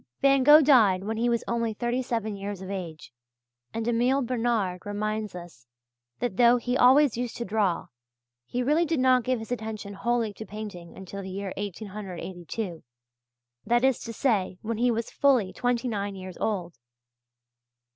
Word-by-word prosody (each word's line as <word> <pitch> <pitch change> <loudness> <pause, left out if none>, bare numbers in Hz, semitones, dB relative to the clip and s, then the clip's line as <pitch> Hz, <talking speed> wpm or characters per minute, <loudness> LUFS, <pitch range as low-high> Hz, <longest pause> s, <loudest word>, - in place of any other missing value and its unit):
Van 275 -1 +4
Gogh 295 +3 +8
died 215 -10 +5
when 220 +2 -3
he 240 +2 +1
was 235 -1 0
only 230 -2 -1
thirty 240 +3 -1
seven 225 -4 -2
years 200 0 -5
of 190 +1 -7
age, 165 -9 -7 0.6
and 225 0 -3
Emile 245 +4 +2
Bernard 230 -7 -1
reminds 215 0 -3
us 170 -9 -11 0.5
that 240 -6 -3
though 240 0 +6
he 245 +1 -2
always 260 0 +5
used 245 -1 -3
to 235 - -3
draw, 200 -4 0 0.6
he 250 +1 -2
really 300 +6 +3
did 325 -3 0
not 255 -1 +4
give 255 +2 0
his 225 +1 -8
attention 220 -3 -4
wholly 230 +1 -1
to 220 - -8
painting 205 -6 -8
until 190 +1 -7
the 190 - -7
year 195 0 -4
1882 190 -2 -6 0.8
that 240 +3 +2
is 265 -2 +3
to 230 - -6
say, 210 -6 0
when 225 0 -3
he 245 +1 +3
was 230 -1 -2
fully 255 -9 +2
twenty 245 0 0
nine 205 -3 -3
years 185 -1 -8
old. 175 - -2
220 Hz, 165 wpm, -27 LUFS, 195-245 Hz, 0.8 s, Gogh